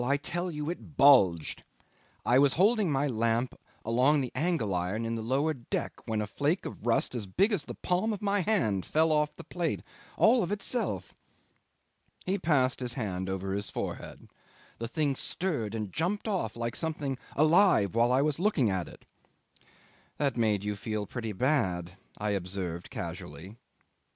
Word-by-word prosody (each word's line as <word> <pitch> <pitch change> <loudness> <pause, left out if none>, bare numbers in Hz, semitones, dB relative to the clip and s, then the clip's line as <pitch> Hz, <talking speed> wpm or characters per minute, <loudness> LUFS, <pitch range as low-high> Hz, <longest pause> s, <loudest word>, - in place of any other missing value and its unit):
I 140 +3 +2
tell 175 +5 -3
you 150 -3 -4
it 160 -4 -10
bulged. 100 - +5 0.6
I 125 +2 +5
was 140 -1 +5
holding 210 +3 +3
up 150 - 0
my 140 +2 +1
lamp 115 0 0 0.3
along 130 +6 +3
the 125 - -3
angle 155 - 0
iron 90 +6 -1
in 115 - -2
the 115 - -3
lower 135 +7 +1
deck 120 -5 -3
when 110 -2 0
a - - -1
flake 145 - -1
of 115 - -7
rust 115 - +2
as 115 -5 -3
big 195 - +2
as 170 -8 0
the - - -7
palm 185 +5 0
of 210 - -3
my 205 0 +1
hand 165 - +1
fell 160 +1 +2
off 150 -1 +1
the - - -10
plate, 170 -3 -2 0.3
all 235 +2 +5
of 185 - -2
itself." 210 +4 -2 1.1
He 195 +2 0
passed 140 -6 +2
his 125 -1 -3
hand 95 -6 -3
over 95 0 -3
his 100 +1 -2
forehead. - - -6 0.5
"The 115 - -3
thing 145 +1 0
stirred 130 - -2
and 105 -4 -4
jumped 185 +7 -1
off 185 - -1
like 115 0 -3
something 150 -5 -3 0.2
alive 155 - +4
while 120 +2 +3
I 130 +2 +4
was 150 0 0
looking 170 - +2
at 95 -3 -2
it." - - -14 1.1
"That 140 -4 +1
made 110 -4 +1
you 105 0 -1
feel 105 +1 -3
pretty 115 0 -4
bad," 95 - 0 0.2
I 105 0 -1
observed 90 -3 -3
casually. 95 +6 -7
130 Hz, 175 wpm, -29 LUFS, 105-160 Hz, 1.1 s, bulged